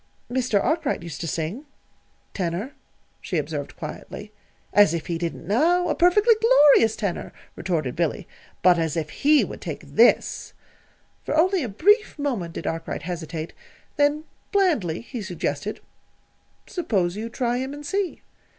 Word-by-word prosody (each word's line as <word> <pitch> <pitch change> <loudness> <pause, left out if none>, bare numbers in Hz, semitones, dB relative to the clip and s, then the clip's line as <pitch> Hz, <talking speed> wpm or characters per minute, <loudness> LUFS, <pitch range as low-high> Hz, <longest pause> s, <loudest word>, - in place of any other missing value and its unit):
"Mr. 250 -5 +1
Arkwright 305 - 0
used 165 -5 -7
to 165 - -3
sing 170 - -4 0.7
tenor," 185 +7 -3 0.5
she - - -3
observed - - -4
quietly. - - -8 0.4
"As 205 -5 +5
if 160 -3 -4
he 170 -1 -3
didn't 170 -1 -4
now 330 - +2
a - - +2
perfectly 415 +7 +5
glorious 295 - +6
tenor," 200 -5 -3 0.2
retorted 155 -8 -2
Billy. 170 +2 -1 0.4
"But 180 -1 +6
as 160 -1 -1
if 155 -1 -3
he 300 +1 +4
would - - -9
take - - -5
this!" - - +2 0.7
For 305 - -1
only 370 +3 +3
a 250 - -3
brief 415 - +3
moment 240 - -2
did - - -6
Arkwright 165 0 -4
hesitate; 165 -2 -5 0.4
then 290 +1 +2 0.3
blandly 310 - +1
he 240 0 -7
suggested: 180 0 -3 0.8
"Suppose 195 - -1
you 220 +2 -4
try 240 0 -1
him, 265 +1 -3
and 290 +1 -8
see." 390 +1 -2
220 Hz, 145 wpm, -24 LUFS, -, 0.8 s, glorious